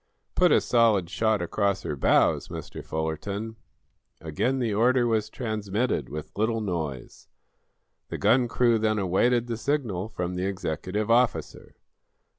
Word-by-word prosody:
"Put -, -, +4 dB
a -, -, +5 dB
solid 110 Hz, -8 st, +2 dB
shot 110 Hz, -4 st, +1 dB
across 100 Hz, +3 st, -1 dB
her 75 Hz, -, -3 dB
bows, 65 Hz, -, +2 dB
Mr. -, -, -8 dB
Fullerton." 100 Hz, +8 st, -4 dB, 0.6 s
Again 80 Hz, -, -1 dB
the 120 Hz, -5 st, -1 dB
order 120 Hz, +4 st, +3 dB
was 110 Hz, -2 st, 0 dB
transmitted, 110 Hz, 0 st, -2 dB
with 75 Hz, +2 st, -7 dB
little 110 Hz, +2 st, 0 dB
noise. 80 Hz, -, -5 dB, 0.8 s
The -, -, -4 dB
gun 125 Hz, -1 st, +3 dB
crew 120 Hz, -1 st, +2 dB
then 110 Hz, 0 st, +1 dB
awaited 115 Hz, +6 st, +2 dB
the 115 Hz, -2 st, -4 dB
signal 115 Hz, -8 st, -2 dB
from 90 Hz, -4 st, -4 dB
the 90 Hz, +1 st, -2 dB
executive 100 Hz, +3 st, -3 dB
officer. 125 Hz, +2 st, 0 dB
105 Hz, 135 wpm, -26 LUFS, 90-115 Hz, 0.8 s, a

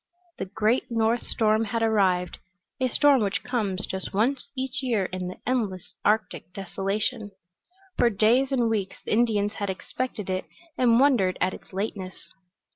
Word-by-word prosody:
The -, -, -2 dB
great 220 Hz, +6 st, 0 dB
north 230 Hz, 0 st, +1 dB
storm 220 Hz, 0 st, +2 dB
had 225 Hz, +2 st, -1 dB
arrived 190 Hz, -5 st, +2 dB, 0.4 s
a 260 Hz, -, +2 dB
storm 275 Hz, +1 st, +4 dB
which 200 Hz, -2 st, -1 dB
comes 210 Hz, -6 st, -1 dB
just 190 Hz, +1 st, -5 dB
once 250 Hz, +7 st, +1 dB
each 265 Hz, +2 st, -2 dB
year 230 Hz, -7 st, +1 dB
in 185 Hz, 0 st, -4 dB
the 180 Hz, -, -7 dB
endless 215 Hz, -8 st, -2 dB
Arctic 210 Hz, -4 st, 0 dB
desolation. 200 Hz, +4 st, -2 dB, 0.7 s
For 240 Hz, -, +5 dB
days 235 Hz, +6 st, +3 dB
and 245 Hz, -3 st, +2 dB
weeks 210 Hz, -4 st, -1 dB
the -, -, -4 dB
Indians 215 Hz, -3 st, +2 dB
had 200 Hz, -, -1 dB
expected 210 Hz, +2 st, -4 dB
it 185 Hz, 0 st, -2 dB, 0.3 s
and 235 Hz, -2 st, +4 dB
wondered 245 Hz, -10 st, +3 dB
at 185 Hz, -, +1 dB
its -, -, -12 dB
lateness. 190 Hz, -1 st, -4 dB
215 Hz, 155 wpm, -26 LUFS, 195-240 Hz, 0.7 s, For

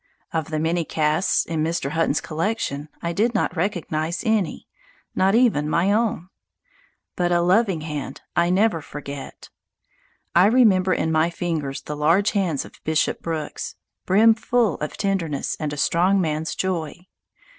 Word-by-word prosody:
Of 160 Hz, -2 st, -2 dB
the 155 Hz, -, -2 dB
many 165 Hz, +2 st, 0 dB
casts 155 Hz, +4 st, +1 dB
in 160 Hz, -2 st, -2 dB
Mr. 160 Hz, -4 st, -1 dB
Hutton's 160 Hz, -2 st, +1 dB
collection 155 Hz, -4 st, -3 dB
I 170 Hz, 0 st, -1 dB
did 225 Hz, +6 st, +1 dB
not 220 Hz, -, 0 dB
recognize 170 Hz, -3 st, -2 dB
any, 215 Hz, -7 st, 0 dB, 0.5 s
not 195 Hz, +2 st, +2 dB
even 215 Hz, -12 st, +3 dB
my 175 Hz, +5 st, +2 dB
own. 210 Hz, -5 st, 0 dB, 0.9 s
But 175 Hz, -1 st, 0 dB
a 175 Hz, -, +3 dB
loving 185 Hz, 0 st, +2 dB
hand 150 Hz, -3 st, -5 dB
I 170 Hz, +1 st, +3 dB
never 190 Hz, -2 st, +2 dB
forget. 140 Hz, -1 st, -9 dB, 0.8 s
I 180 Hz, +3 st, +6 dB
remember 205 Hz, -6 st, +4 dB
in 160 Hz, -, -1 dB
my 160 Hz, +1 st, +2 dB
fingers 165 Hz, -6 st, -3 dB
the 150 Hz, -, -5 dB
large 165 Hz, +8 st, +3 dB
hands 180 Hz, -8 st, -1 dB
of -, -, -16 dB
Bishop 160 Hz, 0 st, 0 dB
Brooks, 160 Hz, -2 st, -4 dB, 0.3 s
brimful 225 Hz, 0 st, +3 dB
of 150 Hz, -, -5 dB
tenderness 175 Hz, -8 st, -1 dB
and 150 Hz, -2 st, -2 dB
a 145 Hz, -, -5 dB
strong 180 Hz, +7 st, +2 dB
man's 160 Hz, -2 st, -1 dB
joy. 180 Hz, -2 st, -3 dB
170 Hz, 145 wpm, -23 LUFS, 155-195 Hz, 0.9 s, I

